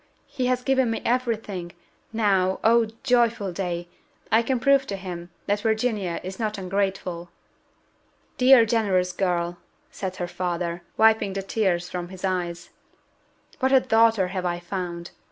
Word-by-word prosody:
he 255 -3 -2
has 250 0 0
given 265 -2 +2
me 225 - -1
every 245 -1 +1
thing. 185 -5 -7 0.4
Now 195 -4 +1
oh, 230 0 +4 0.2
joyful 235 -6 +2
day! 175 -2 -3 0.4
I 220 +2 +5
can 255 +1 -1
prove 275 +1 +3
to 200 - -3
him 180 -2 -7 0.2
that 205 +1 0
Virginia 220 -5 0
is 190 +1 -7
not 215 -2 -2
ungrateful!" 190 -2 -2 1.1
"Dear, 250 -2 +7
generous 200 -5 +1
girl," 175 -2 -1 0.3
said 185 -1 -5
her 180 -1 -3
father, 175 -1 -3 0.2
wiping 220 -3 +4
the 195 0 -3
tears 190 -4 0
from 175 -1 -5
his 190 0 -6
eyes, 175 -2 -3 0.9
"what 260 0 +2
a 265 - +7
daughter 225 -5 +3
have 185 -1 -3
I 175 -1 -1
found! 175 -1 -5
195 Hz, 150 wpm, -25 LUFS, 180-225 Hz, 1.1 s, Dear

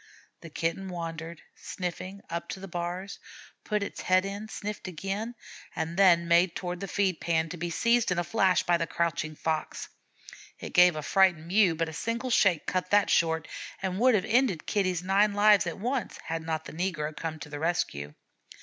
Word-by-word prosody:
The 170 - -10
Kitten 165 +5 -2
wandered, 165 -1 -6
sniffing, 185 +2 -6
up 170 0 -5
to - - -5
the 195 - -8
bars, 175 +2 -5 0.4
put 210 -1 -1
its - - -6
head 185 +1 +3
in, 200 +2 -5
sniffed 210 -2 -6
again, 195 +7 -4 0.4
then 170 0 +3
made 170 +1 +4
toward 180 -1 -4
the 195 - -5
feed 190 -3 0
pan, 165 -1 0
to 175 - -6
be 175 +1 -3
seized 230 +4 +2
in 180 - 0
a 175 - +1
flash 190 -1 +2
by 175 0 +3
the 165 0 -2
crouching 155 -1 -2
Fox. 160 0 -3 0.7
It - - -8
gave 180 -1 +6
a 155 - -4
frightened 185 -4 +3
"mew," 185 -1 +3
but 165 +1 -1
a 160 - -7
single 235 +8 -3
shake 185 -8 +3
cut 185 0 -1
that 205 0 +3
short 160 -1 +2 0.3
and 190 0 -3
would 250 0 +5
have 195 -1 +1
ended 230 -7 +2
Kitty's 185 -4 0
nine 200 +2 +3
lives 205 -2 +5
at 170 - -4
once, 245 +3 -2
had 165 0 -3
not 160 -1 -3
the - - -9
negro 155 -3 -2
come 160 -1 -4
to 150 0 -9
the 145 0 -6
rescue. 75 - -2
180 Hz, 190 wpm, -28 LUFS, 165-195 Hz, 0.7 s, gave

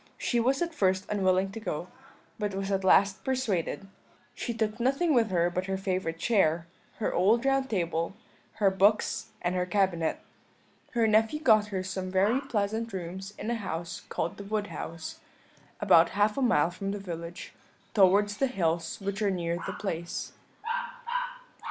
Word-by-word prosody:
She 240 - 0
was 265 +7 +2
at 340 -1 -4
first 190 -9 +1
unwilling 190 -1 +2
to 225 - -6
go, 175 -5 -4 0.5
but 205 -2 -2
was 195 0 -2
at 195 -1 0
last 195 +1 +4
persuaded; 210 - -1 0.5
she 240 - -3
took 220 -1 -2
nothing 275 +7 +2
with 230 -4 +3
her 175 -1 +2
but 185 +2 -2
her 190 0 -1
favourite 185 -4 -2
chair, 170 -5 +2 0.3
her 220 - -1
old 220 +8 +3
round 270 0 +2
table, 170 -2 -1 0.4
her 200 -3 +3
books, 200 +3 +2 0.2
and 175 - +1
her 180 0 0
cabinet. 180 -4 +1 0.7
Her 235 -2 +3
nephew 220 +6 +3
got 215 -8 +5
her 190 -3 -3
some 185 0 -4
very 200 +8 +2
pleasant 225 -3 -1
rooms 190 +2 -6
in 215 +3 -3
a - - +1
house 170 -5 -4
called 165 - -2
the 200 - -7
Wood 205 0 -2
House, 165 -1 -6 0.6
about 165 +1 +6
half 210 +1 +3
a 275 - -1
mile 175 - +3
from 195 +2 -4
the 205 +1 -3
village, 170 -2 -7 0.4
towards 205 0 +4
the 270 - +2
hills 165 -8 -1
which 200 +2 -3
are 205 - +3
near 170 -2 -1
the - - -3
place. 170 -4 -4
195 Hz, 165 wpm, -29 LUFS, 180-220 Hz, 0.7 s, about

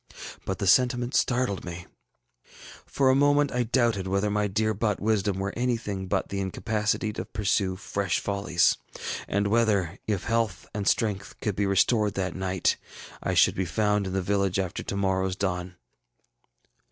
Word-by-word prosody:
But 95 - -2
the 100 - -2
sentiment 125 +4 +3
startled 120 -6 +1
me. 90 0 -7 1.0
For 135 -2 +3
a - - +3
moment 145 0 +3
I 125 - 0
doubted 115 -5 +1
whether 100 +2 0
my 105 0 +1
dear 110 +2 0
bought 105 0 -1
wisdom 105 -2 +1
were 100 +1 -2
anything 115 -6 -2
but 95 0 -1
the 100 - -3
incapacity 110 +2 -1
to - - -4
pursue 95 -2 0
fresh 95 -1 -1
follies, 100 -3 +1 0.5
and 100 +1 0
whether, 100 -5 +1
if 100 -4 -1
health 115 -4 -1
and 100 -1 -3
strength 105 -4 0
could 105 -3 -2
be 100 0 0
restored 105 +1 +2
that 95 -2 -2
night, 95 -1 0 0.4
I - - -1
should - - +5
be 95 - -1
found 105 +3 +1
in 95 - -4
the 95 -1 0
village 100 0 +1
after 95 -2 -2
to - - -4
morrowŌĆÖs 95 -1 0
dawn. 90 -2 -2
100 Hz, 165 wpm, -27 LUFS, 95-110 Hz, 1.0 s, should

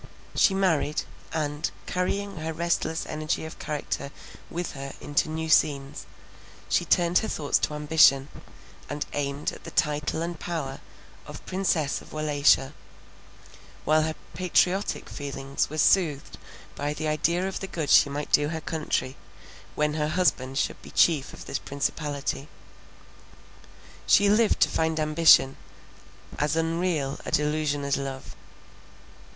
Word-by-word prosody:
She 195 - +4
married; 165 -6 +1 0.3
and, 150 -1 -2 0.2
carrying 195 +2 -2
her 160 +1 -3
restless 165 -1 -1
energy 155 +1 -3
of 160 - -9
character 145 -2 -3 0.4
with 175 0 -4
her 135 -1 -7
into 145 +2 0
new 160 +1 -3
scenes, 140 -3 +1 0.6
she - - +1
turned 175 0 +3
her 220 - -3
thoughts 145 -8 0
to 150 - -1
ambition, 150 -2 +5 0.6
and 145 +1 -3
aimed 140 0 -2
at - - -12
the - - -7
title 150 +1 0
and 170 -1 -5
power 145 -6 -4 0.5
of - - -10
Princess 170 -6 0
of - - -15
Wallachia; 145 -2 +3 1.1
while 155 +1 +4
her 155 0 -1 0.2
patriotic 185 +3 +1
feelings 140 -1 -3
were 155 - -6
soothed 155 -3 +2 0.4
by 145 +1 -2
the 155 +1 -3
idea 170 +4 +1
of 190 - -4
the 195 - -5
good 160 -5 -3
she - - +7
might 145 +1 -5
do 145 0 +4
her 160 0 -3
country, 155 -5 -2 0.6
when 150 0 +1
her 150 -1 0
husband 135 -6 0
should - - -1
be - - -12
chief 155 -6 +3
of - - -11
this - - -3
principality. 140 0 -3 1.6
She 200 0 +5
lived 215 +1 +3
to - - +6
find 160 0 0
ambition, 155 -3 +5 0.8
as 150 +2 +1
unreal 165 -3 -1
a - - -5
delusion 150 -1 0
as 140 0 0
love. 135 -1 -6
155 Hz, 140 wpm, -26 LUFS, 145-165 Hz, 1.6 s, she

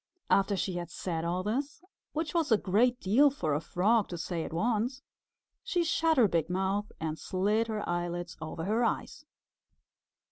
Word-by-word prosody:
After 195 0 +3
she 185 -1 -2
had 175 -1 -5
said 170 -1 -3
all 175 +2 -1
this, 275 +9 -2 0.3
which 315 0 -3
was 330 -6 +1
a 220 - +7
great 235 +6 +2
deal 250 +10 +5
for 160 - -2
a 145 - 0
Frog 210 +6 +2
to 175 - -6
say 170 0 -3
at - - -6
once, 235 +8 0 0.6
she 350 -1 0
shut 325 -1 +2
her 235 -4 +6
big 165 -3 0
mouth 195 +3 -1
and 160 -1 -3
slid 210 +4 0
her 215 -2 -3
eyelids 175 -1 -3
over 160 +1 -5
her 220 +5 +1
eyes. - - -2
200 Hz, 175 wpm, -30 LUFS, 175-240 Hz, 0.6 s, a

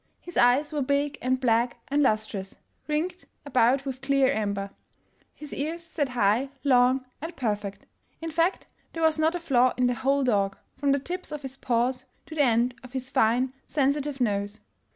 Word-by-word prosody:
His 350 - -11
eyes 260 +6 +4
were 295 - 0
big 280 +1 0
and 255 +1 +1
black 240 -1 +2
and 285 +2 +2
lustrous, 215 -6 0 0.3
ringed 325 +4 -2 0.2
about 260 0 +3
with 260 -1 -5
clear 275 -1 +3
amber; 200 -2 -2 0.6
his 300 -1 -9
ears 320 +4 -3
sat 290 -4 -2
high, 240 +2 +2
long 255 -1 +4 0.2
and 325 +2 -6
perfect. 205 -6 -3 0.3
In 325 0 -5
fact, 335 +4 +1 0.3
there 330 - -3
was 320 -1 +3
not 320 +2 +2
a - - -2
flaw 255 -6 +3
in 250 - +3
the 245 - +2
whole 270 +3 +1
dog, 200 -5 +1 0.2
from 280 +1 +1
the 280 - +4
tips 355 +7 -5
of 300 -1 -5
his 265 0 -6
paws 250 +1 0 0.2
to - - -10
the 310 - +1
end 240 -1 +3
of 255 0 -13
his 260 0 -4
fine, 250 0 +2
sensitive 280 0 0
nose. 205 -3 -1
265 Hz, 180 wpm, -27 LUFS, 240-290 Hz, 0.6 s, eyes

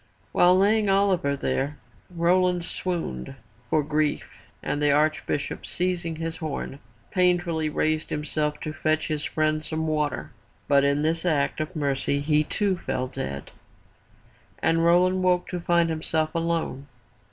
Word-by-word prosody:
While 180 +1 +5
laying 205 +2 +3
Oliver 190 -8 +2
there, 140 +1 -1 0.3
Roland 180 0 +2
swooned 150 - -3 0.3
for 155 +2 +2
grief 150 0 0 0.4
and 145 - -2
the 145 - +3
Arch 155 +2 +2
bishop, 145 - -2
seizing 175 -2 -1
his 165 0 -4
horn, 150 -3 -5 0.3
painfully 175 -4 +2
raised 155 +1 0
himself 150 0 -2
to 155 - -4
fetch 155 0 0
his 150 -1 -2
friend 155 0 0
some 160 +1 -3
water. 150 -2 -1 0.4
But 140 -1 +4
in 140 +1 +2
his 165 +1 +1
act 155 -6 +1
of 155 +4 -4
mercy, 140 -1 0
he 150 +1 +2
too 195 +2 0
fell 130 0 -2
dead, 70 - -5 1.1
and 165 0 +2
Roland 180 +2 +4
woke 180 -1 +2
to 180 - -3
find 170 0 +2
himself 160 0 -1
alone. 165 -5 -2
155 Hz, 140 wpm, -25 LUFS, 150-175 Hz, 1.1 s, While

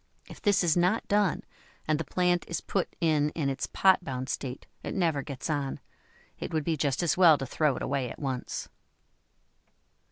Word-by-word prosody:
If - - -12
this 200 -3 +3
is 165 -3 +3
not 180 +6 +2
done, 205 -4 +2 0.4
and 155 0 +2
the - - -1
plant 180 +3 +1
is 170 - -2
put 195 - -2
in 155 -3 +3
in 145 -4 0
its 135 - -2
pot 190 -1 +4
bound 130 -3 -4
state, 130 -1 -4 0.2
it - - -5
never 165 -6 +1
gets 135 -2 -6
on; 145 -4 -2 0.6
it - - -5
would 155 -2 0
be 165 +1 0
just 145 +1 0
as 165 -4 +1
well 170 -5 +7
to 135 - -4
throw 145 +1 +1
it - - -5
away 135 -3 -1
at - - -8
once. 130 -3 -4
155 Hz, 190 wpm, -28 LUFS, 140-175 Hz, 0.6 s, well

